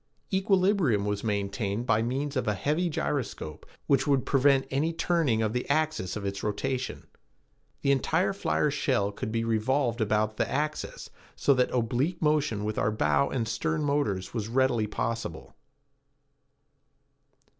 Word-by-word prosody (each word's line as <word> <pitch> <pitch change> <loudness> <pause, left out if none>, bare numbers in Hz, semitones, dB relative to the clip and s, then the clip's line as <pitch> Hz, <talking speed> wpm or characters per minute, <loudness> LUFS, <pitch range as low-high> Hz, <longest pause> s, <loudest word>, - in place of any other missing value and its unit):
Equilibrium 190 - +2
was 105 -1 -2
maintained 100 +1 -2
by 115 -3 +3
means 135 +5 -2
of 130 -3 -1
a 105 - +1
heavy 155 - 0
gyroscope 130 - -3 0.2
which 140 +2 +2
would 140 -3 +2
prevent 135 0 +3
any 145 +5 +1
turning 165 -9 +1
of 110 0 -1
the 125 +2 -3
axis 155 -9 0
of 105 -2 -5
its 100 0 -3
rotation. 130 +5 -3 0.8
The 140 - +3
entire 160 +8 +1
flyer 150 -6 0
shell 130 -8 +1
could 105 - -5
be 115 0 0
revolved 115 +2 +1
about 110 0 +1
the - - 0
axis 150 +2 -3 0.2
so 140 - +3
that 125 -1 +2
oblique 125 +8 0
motion 145 -9 +1
with 105 0 -2
our - - +2
bow 110 +5 +2
and 115 -4 -2
stern 155 +8 -1
motors 140 -11 -1
was 110 -3 -2
readily 120 -2 +2
possible. 115 +2 -4
125 Hz, 145 wpm, -28 LUFS, 110-145 Hz, 0.8 s, by